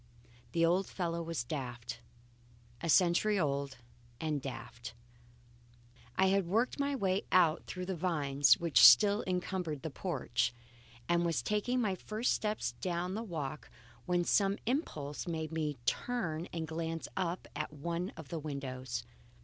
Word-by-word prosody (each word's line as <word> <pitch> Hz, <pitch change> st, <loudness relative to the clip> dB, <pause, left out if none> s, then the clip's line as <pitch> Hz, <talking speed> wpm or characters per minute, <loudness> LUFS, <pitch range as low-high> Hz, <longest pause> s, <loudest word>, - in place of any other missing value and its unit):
The 165 Hz, 0 st, +4 dB
old 180 Hz, +3 st, +2 dB
fellow 170 Hz, -2 st, -2 dB
was 165 Hz, -6 st, -2 dB
daft. 120 Hz, -3 st, -5 dB, 0.8 s
A 165 Hz, -, -2 dB
century 185 Hz, +5 st, +4 dB
old, 140 Hz, -4 st, -1 dB, 0.4 s
and 155 Hz, -3 st, -1 dB
daft. 120 Hz, -3 st, -7 dB, 1.2 s
I 190 Hz, 0 st, +4 dB
had 195 Hz, -2 st, +2 dB
worked 230 Hz, +9 st, +1 dB
my 280 Hz, 0 st, +1 dB
way 195 Hz, -5 st, 0 dB
out 170 Hz, -3 st, +4 dB
through 180 Hz, 0 st, -5 dB
the 190 Hz, 0 st, -2 dB
vines 145 Hz, -5 st, +3 dB
which 170 Hz, -3 st, +4 dB
still 205 Hz, -, +8 dB
encumbered 180 Hz, -5 st, -2 dB
the 160 Hz, -, -4 dB
porch, 130 Hz, -8 st, -1 dB, 0.5 s
and 175 Hz, 0 st, +3 dB
was 170 Hz, -2 st, 0 dB
taking 210 Hz, +4 st, 0 dB
my 205 Hz, -4 st, +1 dB
first 215 Hz, +6 st, -1 dB
steps 215 Hz, 0 st, -1 dB
down 180 Hz, 0 st, -1 dB
the 215 Hz, -, -2 dB
walk, 155 Hz, -9 st, -5 dB, 0.4 s
when 175 Hz, -1 st, +2 dB
some 195 Hz, +3 st, +2 dB
impulse 165 Hz, -, -2 dB
made 160 Hz, -2 st, -3 dB
me 155 Hz, -3 st, -2 dB
turn 175 Hz, -, -1 dB
and 165 Hz, -2 st, -3 dB
glance 165 Hz, +1 st, -3 dB
up 180 Hz, -1 st, -2 dB
at 150 Hz, +1 st, -3 dB
one 170 Hz, +5 st, -3 dB
of 160 Hz, -4 st, -9 dB
the 165 Hz, -, -3 dB
windows. 130 Hz, -5 st, -4 dB
170 Hz, 145 wpm, -33 LUFS, 145-190 Hz, 1.2 s, still